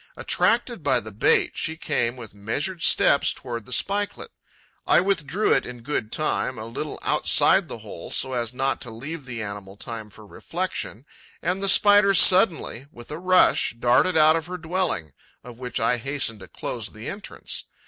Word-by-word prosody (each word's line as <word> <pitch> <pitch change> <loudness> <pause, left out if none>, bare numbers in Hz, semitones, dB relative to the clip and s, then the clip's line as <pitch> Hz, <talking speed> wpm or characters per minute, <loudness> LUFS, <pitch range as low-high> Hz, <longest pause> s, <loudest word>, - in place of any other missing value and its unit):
Attracted 235 -3 0
by 130 -4 +2
the 110 -2 -10
bait, 100 - +2
she 160 +1 -2
came 120 -6 -1
with 115 -6 -10
measured 140 - -3
steps 140 - +4
towards 115 -4 -7
the - - -12
spikelet. 200 +9 -1 0.6
I - - +5
withdrew 185 0 +1
it - - +2
in 120 -1 -8
good 120 -5 -3
time 130 -4 -1
a 110 - -6
little 130 +6 -6
outside - - +4
the - - -6
hole, - - -9
so 130 - -1
as 120 -2 -2
not 135 0 -1
to 120 - -6
leave 140 +7 -8
the 120 -4 -5
animal 100 -1 -8
time 110 -1 -7
for 105 +1 -15
reflexion; 165 - -5 0.4
and 180 +3 -1
the 195 - +2
Spider 205 0 +6
suddenly, 180 - +4
with 120 +3 -13
a 150 - -5
rush, 185 -8 +3
darted 125 +9 +3
out 155 0 +6
of 165 0 -3
her 180 +1 -5
dwelling, 170 - -2 0.3
of 120 -1 -12
which 125 -1 -4
I 115 +2 +2
hastened 130 -3 -2
to 95 - -11
close - - -5
the - - -10
entrance. - - -6
135 Hz, 180 wpm, -24 LUFS, 115-180 Hz, 0.6 s, Spider